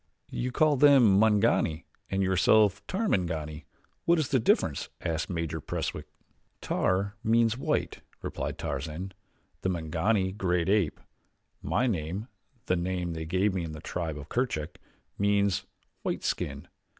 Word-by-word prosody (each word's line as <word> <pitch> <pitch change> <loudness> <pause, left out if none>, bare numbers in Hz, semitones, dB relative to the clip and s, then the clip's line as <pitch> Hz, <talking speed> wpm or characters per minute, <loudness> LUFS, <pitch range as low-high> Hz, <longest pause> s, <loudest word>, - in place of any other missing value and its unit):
"You 125 +1 -2
call 150 +1 +3
them 130 -8 +6
Mangani 100 -7 +3 0.2
and 95 0 0
yourself 100 +2 +4
Tarmangani 85 - -1 0.4
what 170 +1 +4
is 155 -4 0
the 130 - +3
difference?" 110 - +1
asked 80 -2 -2
Major 85 -3 -3
Preswick. - - -4 0.5
"Tar 100 +3 0
means 115 0 +3
white," 130 - -1 0.2
replied - - -4
Tarzan, 80 +7 -4 0.5
"and 95 - +1
Mangani, 95 +4 0
great 90 -3 0
ape. 100 -7 +2 0.6
My 125 - +1
name 95 +1 -2 0.4
the 90 - +2
name 90 -1 -2
they 80 -1 -4
gave 95 +4 +1
me 90 -2 -1
in 80 -2 -5
the 75 - -7
tribe 80 -2 -4
of 70 - -8
Kerchak 115 - -2 0.4
means 100 -1 +2 0.3
White - - -2
skin. - - -2
95 Hz, 135 wpm, -28 LUFS, 85-110 Hz, 0.6 s, them